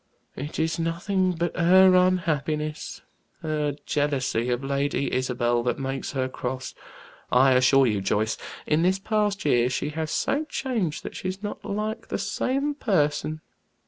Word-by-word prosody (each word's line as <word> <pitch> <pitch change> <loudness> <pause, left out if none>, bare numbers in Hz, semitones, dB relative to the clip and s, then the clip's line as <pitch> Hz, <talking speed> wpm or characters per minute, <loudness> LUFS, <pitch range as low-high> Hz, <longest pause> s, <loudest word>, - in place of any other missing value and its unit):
It 145 +3 -6
is 160 +1 0
nothing 180 +3 0
but 170 +1 -2
her 185 +2 +6
unhappiness, 155 -5 0 0.4
her 150 -2 -1
jealousy 135 -5 0
of 125 +2 -1
Lady 140 0 -1
Isabel, 120 -2 +1
that 120 +1 -1
makes 135 +1 -4
her 130 -2 0
cross. 130 0 -5 0.6
I 130 +2 +5
assure 130 +1 +5
you, 105 -5 +1
Joyce, 105 +3 0 0.3
in 155 +1 +2
this 185 +2 +3
past 205 -1 -1
year 125 -4 +3
she 130 - -2
had 155 +1 -3
so 295 - 0
changed 230 - -2
that - - -7
she's 185 +2 -5
not 205 - -5
like 215 +2 -3
the - - -2
same 275 +3 -1
person. 155 - 0
155 Hz, 145 wpm, -25 LUFS, 130-185 Hz, 0.6 s, her